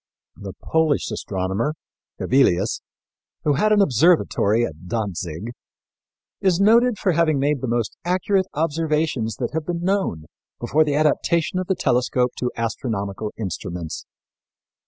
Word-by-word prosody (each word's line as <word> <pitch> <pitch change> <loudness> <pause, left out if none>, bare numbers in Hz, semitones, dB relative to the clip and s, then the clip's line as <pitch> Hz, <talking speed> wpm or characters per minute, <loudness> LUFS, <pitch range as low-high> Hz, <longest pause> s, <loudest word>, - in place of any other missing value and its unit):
" - - -64
The 95 - -6
Polish 160 -6 0
astronomer, 100 +7 -2 0.4
Hevilius, 110 -7 +2 0.6
who 150 - +2
had 210 +10 +2
an 210 -1 +5
observatory 125 - +3
at 80 -2 -9
Dantzig, 100 -2 -3 0.9
is 185 -2 +2
noted 230 +3 +4
for 190 - +1
having 160 -2 +2
made 140 0 0
the 130 - -2
most 120 -2 -1
accurate 185 +2 +1
observations 155 -7 0
that - - -3
had 160 -1 -3
been 175 -1 -2
known 190 - 0 0.3
before 150 +6 +2
the 145 -2 -1
adaptation 155 +3 +1
of 185 - -3
the 190 - +1
telescope 125 -4 +1
to 125 - 0
astronomical 110 -3 -3
instruments. 90 -5 -5
140 Hz, 135 wpm, -22 LUFS, 110-170 Hz, 0.9 s, an